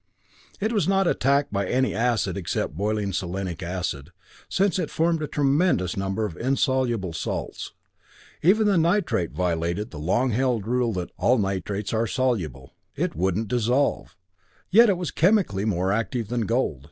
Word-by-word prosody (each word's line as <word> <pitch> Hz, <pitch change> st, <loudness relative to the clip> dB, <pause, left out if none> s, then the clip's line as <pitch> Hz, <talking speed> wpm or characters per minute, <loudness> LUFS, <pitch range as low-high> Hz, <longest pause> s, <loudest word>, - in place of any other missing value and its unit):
It 220 Hz, +3 st, -1 dB
was 205 Hz, -4 st, +1 dB
not 195 Hz, 0 st, +3 dB
attacked 140 Hz, -5 st, +1 dB
by 100 Hz, -1 st, 0 dB
any 130 Hz, +4 st, +1 dB
acid 115 Hz, -5 st, 0 dB
except 90 Hz, -5 st, -3 dB
boiling 105 Hz, +1 st, -1 dB
selenic 90 Hz, -1 st, -3 dB
acid, 85 Hz, -5 st, -4 dB, 0.4 s
since 195 Hz, -1 st, +1 dB
it -, -, -2 dB
formed 165 Hz, 0 st, +1 dB
a 150 Hz, -, -2 dB
tremendous 140 Hz, -, +1 dB
number 95 Hz, +2 st, -1 dB
of 95 Hz, -6 st, -5 dB
insoluble 125 Hz, -, 0 dB
salts. 80 Hz, -, -4 dB, 0.7 s
Even 210 Hz, +6 st, +4 dB
the 200 Hz, -4 st, +3 dB
nitrate 165 Hz, -, +1 dB
violated 85 Hz, +3 st, -1 dB
the 75 Hz, -, -8 dB
long 120 Hz, -, +1 dB
held 120 Hz, -3 st, 0 dB
rule 120 Hz, 0 st, +1 dB
that 90 Hz, -2 st, -4 dB
"all 125 Hz, +2 st, +3 dB
nitrates 100 Hz, 0 st, -2 dB
are 115 Hz, +1 st, +1 dB
soluble" 100 Hz, -, -2 dB, 0.2 s
it -, -, -2 dB
wouldn't 95 Hz, +6 st, 0 dB
dissolve. 125 Hz, +5 st, 0 dB, 0.5 s
Yet 230 Hz, +4 st, +7 dB
it 190 Hz, -, +2 dB
was 180 Hz, -2 st, -3 dB
chemically 165 Hz, -, +2 dB
more 95 Hz, -2 st, 0 dB
active 115 Hz, +1 st, -2 dB
than 120 Hz, -3 st, -1 dB
gold. 115 Hz, -, 0 dB
115 Hz, 155 wpm, -24 LUFS, 95-140 Hz, 0.7 s, Yet